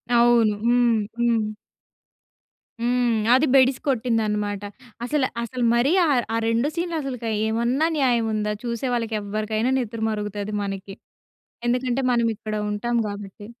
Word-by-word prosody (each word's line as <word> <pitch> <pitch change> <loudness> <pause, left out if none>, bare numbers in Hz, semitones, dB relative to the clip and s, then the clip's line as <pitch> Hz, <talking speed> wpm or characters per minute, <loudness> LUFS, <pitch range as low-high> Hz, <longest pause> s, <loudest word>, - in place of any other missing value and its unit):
అవును. 235 -2 +5
హ్మ్. 240 -1 +4 0.2
హ్మ్. 230 -2 +2 1.3
హ్మ్. 240 -2 +1
అది 265 +4 +5
బెడిసి 260 -1 +5
కొట్టిందన్నమాట. 215 -5 0 0.4
అసలు 280 -1 +1 0.2
అసలు 245 +1 -4
మరి 245 +5 +3
ఆహ్, 270 -5 +3
ఆ - - +1
2 230 +5 +1
సీన్‌లు 340 0 -2
అసలుకు 250 -4 -5 0.2
ఏమన్నా 235 +8 +1
న్యాయం 240 -5 +2
ఉందా? 210 0 -1
చూసే 235 +2 -3
వాళ్ళకి 230 -2 -1
ఎవ్వరికైనా 215 +4 -1
నెత్తురు 225 -2 -3
మరుగుతది 210 -1 -4
మనకి. 195 0 -6 0.7
ఎందుకంటే 250 +1 0
మనం 235 -1 +2
ఇక్కడ 215 -1 -5 0.2
ఉంటాం 235 +3 -1
కాబట్టి. 205 0 -8
235 Hz, 130 wpm, -23 LUFS, 215-250 Hz, 1.3 s, అవును